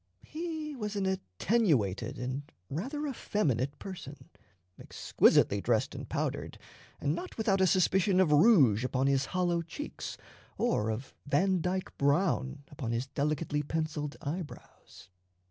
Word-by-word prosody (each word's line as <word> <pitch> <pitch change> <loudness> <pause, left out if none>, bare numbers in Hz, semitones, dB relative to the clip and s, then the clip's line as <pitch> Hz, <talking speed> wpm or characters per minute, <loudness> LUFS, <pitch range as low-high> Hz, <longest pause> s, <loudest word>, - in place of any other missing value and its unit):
He 315 -2 -5
was 210 -4 -4
an 200 -1 0
attenuated 140 - 0
and 130 +4 -4 0.2
rather 270 - -3
effeminate 145 - -1
person, 175 -7 -9 0.5
exquisitely - - +3
dressed - - +1
and - - -7
powdered, - - -2 0.4
and 145 +1 0
not 370 - -6
without 200 -4 +2
a 190 - +5
suspicion 190 +1 +3
of 180 -5 +4
rouge 145 - +6
upon 130 +1 0
his 135 -1 +2
hollow 175 +1 0
cheeks 290 - -7 0.4
or 230 - +1
of 115 +5 -4
Vandyke 185 +4 +1
brown 140 -2 +1
upon 125 -5 -4
his 120 +2 -1
delicately 150 +2 -1
penciled 150 -1 -3
eyebrows. 150 - -8
155 Hz, 125 wpm, -31 LUFS, 135-195 Hz, 0.5 s, rouge